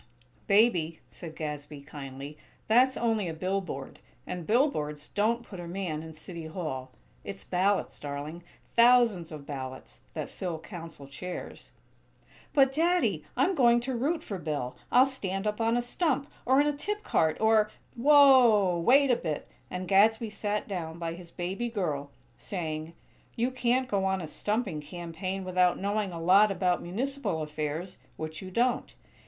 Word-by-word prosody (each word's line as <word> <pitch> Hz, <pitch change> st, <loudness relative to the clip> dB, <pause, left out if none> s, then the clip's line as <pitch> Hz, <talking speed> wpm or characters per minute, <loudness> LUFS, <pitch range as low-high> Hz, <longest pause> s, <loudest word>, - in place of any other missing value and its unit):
"Baby," 180 Hz, -7 st, +3 dB
said 165 Hz, -3 st, -9 dB
Gadsby, 150 Hz, -2 st, -6 dB
kindly, 140 Hz, 0 st, -8 dB, 0.3 s
"that's 255 Hz, +4 st, +4 dB
only 225 Hz, -5 st, +1 dB
a 165 Hz, -, -4 dB
billboard, 185 Hz, -6 st, -3 dB, 0.3 s
and 180 Hz, -3 st, -6 dB
billboards 155 Hz, -, +1 dB
don't 230 Hz, +3 st, +1 dB
put 190 Hz, -5 st, -9 dB
a 175 Hz, -, -6 dB
man 170 Hz, -4 st, -3 dB
in 160 Hz, 0 st, -9 dB
City 165 Hz, 0 st, -8 dB
Hall. 155 Hz, -6 st, -4 dB, 0.3 s
It's 100 Hz, 0 st, -7 dB
ballots, 190 Hz, -, 0 dB
darling; 145 Hz, +4 st, -6 dB, 0.3 s
thousands 235 Hz, -8 st, +5 dB
of 150 Hz, -2 st, -8 dB
ballots, 130 Hz, -, -7 dB, 0.2 s
that -, -, -4 dB
fill 175 Hz, -3 st, -4 dB
Council 165 Hz, -4 st, -9 dB
chairs." 175 Hz, +7 st, -7 dB, 0.8 s
"But, 270 Hz, -2 st, +4 dB
Daddy, 345 Hz, +4 st, +2 dB
I'm 385 Hz, -, +3 dB
going 240 Hz, -6 st, +5 dB
to 255 Hz, +1 st, -3 dB
root 295 Hz, +8 st, 0 dB
for 195 Hz, -3 st, -5 dB
Bill. 145 Hz, -6 st, -3 dB, 0.2 s
I'll 255 Hz, +1 st, +7 dB
stand 195 Hz, -7 st, -3 dB
up 210 Hz, +1 st, -1 dB
on 225 Hz, +1 st, +2 dB
a 245 Hz, -, 0 dB
stump, 280 Hz, +2 st, -1 dB, 0.2 s
or 260 Hz, +2 st, +5 dB
in 290 Hz, -, +4 dB
a 295 Hz, -, +1 dB
tip 420 Hz, +8 st, -4 dB
cart, 160 Hz, -, +1 dB
or 220 Hz, -1 st, +4 dB
" -, -, -34 dB
"Whoa! 245 Hz, -9 st, +6 dB
Wait 265 Hz, +9 st, +5 dB
a -, -, +5 dB
bit!" 155 Hz, -8 st, -4 dB, 0.2 s
and 180 Hz, 0 st, -4 dB
Gadsby 220 Hz, +4 st, +4 dB
sat 210 Hz, 0 st, -2 dB
down 165 Hz, -5 st, -4 dB
by 165 Hz, -1 st, -3 dB
his 175 Hz, 0 st, -11 dB
"baby 190 Hz, +8 st, -3 dB
girl," 155 Hz, -10 st, -2 dB, 0.3 s
saying: 160 Hz, -3 st, -4 dB, 0.4 s
"You 240 Hz, +3 st, 0 dB
can't 255 Hz, 0 st, +1 dB
go 200 Hz, -4 st, 0 dB
on 190 Hz, 0 st, +1 dB
a 165 Hz, -, -5 dB
stumping 205 Hz, -1 st, -2 dB
campaign 175 Hz, +4 st, -5 dB
without 180 Hz, -1 st, +3 dB
knowing 205 Hz, 0 st, -1 dB
a 170 Hz, -, -6 dB
lot 190 Hz, +5 st, +6 dB
about 180 Hz, -2 st, +1 dB
municipal 230 Hz, -, -2 dB
affairs; 150 Hz, +4 st, -4 dB, 0.2 s
which 155 Hz, 0 st, -6 dB
you 190 Hz, -, -7 dB
don't. 240 Hz, +6 st, 0 dB
185 Hz, 160 wpm, -29 LUFS, 160-235 Hz, 0.8 s, I'll